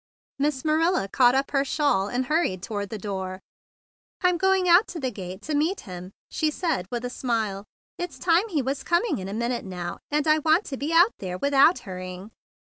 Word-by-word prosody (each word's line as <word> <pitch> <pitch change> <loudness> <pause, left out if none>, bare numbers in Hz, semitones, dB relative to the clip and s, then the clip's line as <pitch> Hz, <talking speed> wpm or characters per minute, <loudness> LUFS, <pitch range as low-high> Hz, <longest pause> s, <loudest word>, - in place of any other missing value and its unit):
Miss 285 -1 0
Marilla 315 - +2
caught 245 +4 +4
up 270 +1 0
her 275 -1 +2
cape, 280 - -4
and 250 -3 +1
hurried 295 - 0
toward 205 -3 -4
the 220 - -5
door. 190 -2 -5 0.8
"I'm 360 -2 +2
going 380 0 +3
out 355 +5 +6
to 340 - -6
the 260 -3 -2
gate 190 -2 -8
to 310 - -3
meet 315 +7 0
him," 180 0 -9 0.2
she 310 - +1
said 305 - -2
with 240 0 -3
a - - -2
smile. 220 -6 -2 0.3
"It's 350 -7 -5
time 350 - +2
he 305 -8 0
was 270 +2 -2
coming 345 - +1
in 185 - -6
a - - -5
minute 235 +1 -2
now, 180 -2 -6
and 300 +1 0
I 310 0 +5
want 320 +6 +3
to 275 - -5
be 290 +4 -3
out 345 +6 +5
there 180 -2 -4
without 280 - +4
hurrying." 185 +2 -7
270 Hz, 205 wpm, -25 LUFS, 195-320 Hz, 0.8 s, out